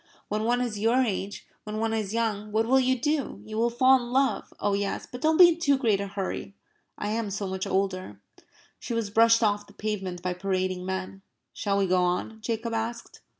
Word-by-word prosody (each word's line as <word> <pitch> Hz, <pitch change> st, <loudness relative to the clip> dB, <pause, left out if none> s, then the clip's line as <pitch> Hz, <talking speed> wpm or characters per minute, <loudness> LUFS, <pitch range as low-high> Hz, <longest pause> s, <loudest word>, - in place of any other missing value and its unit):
"When 215 Hz, +1 st, -1 dB
one 245 Hz, +1 st, +2 dB
is 230 Hz, -4 st, -2 dB
your 235 Hz, +5 st, +3 dB
age 200 Hz, -3 st, -3 dB, 0.2 s
when 215 Hz, 0 st, -5 dB
one 225 Hz, 0 st, 0 dB
is 215 Hz, -3 st, -2 dB
young. 215 Hz, -2 st, -1 dB
What 220 Hz, +1 st, +2 dB
will 265 Hz, +3 st, +4 dB
you 260 Hz, -1 st, +2 dB
do? 295 Hz, +2 st, -1 dB
You 215 Hz, -, -7 dB
will 235 Hz, +1 st, +3 dB
fall 255 Hz, +3 st, +5 dB
in 240 Hz, 0 st, -7 dB
love 270 Hz, +1 st, +1 dB
oh 205 Hz, -, +1 dB
yes! 200 Hz, 0 st, -2 dB
But 250 Hz, -, -9 dB
don't 315 Hz, 0 st, +3 dB
be 355 Hz, -1 st, +10 dB
in 335 Hz, 0 st, -1 dB
too 285 Hz, -5 st, +3 dB
great 220 Hz, -7 st, +1 dB
a 200 Hz, -, -3 dB
hurry. 195 Hz, 0 st, -5 dB, 0.4 s
I 205 Hz, -, -3 dB
am 220 Hz, -1 st, -1 dB
so 200 Hz, +1 st, -3 dB
much 190 Hz, 0 st, -3 dB
older." 185 Hz, -, -2 dB, 0.6 s
She 235 Hz, -, -4 dB
was 220 Hz, -3 st, -2 dB
brushed 230 Hz, +1 st, +5 dB
off 205 Hz, -1 st, +1 dB
the -, -, -17 dB
pavement 190 Hz, -4 st, -4 dB
by 180 Hz, 0 st, -1 dB
parading 185 Hz, 0 st, -2 dB
men. 190 Hz, +1 st, -4 dB, 0.3 s
"Shall 200 Hz, -1 st, -1 dB
we 200 Hz, -, +2 dB
go 185 Hz, 0 st, +2 dB
on?" 180 Hz, +5 st, -1 dB
Jacob 230 Hz, +1 st, -3 dB
asked. 230 Hz, +1 st, -4 dB
215 Hz, 215 wpm, -27 LUFS, 195-235 Hz, 0.6 s, be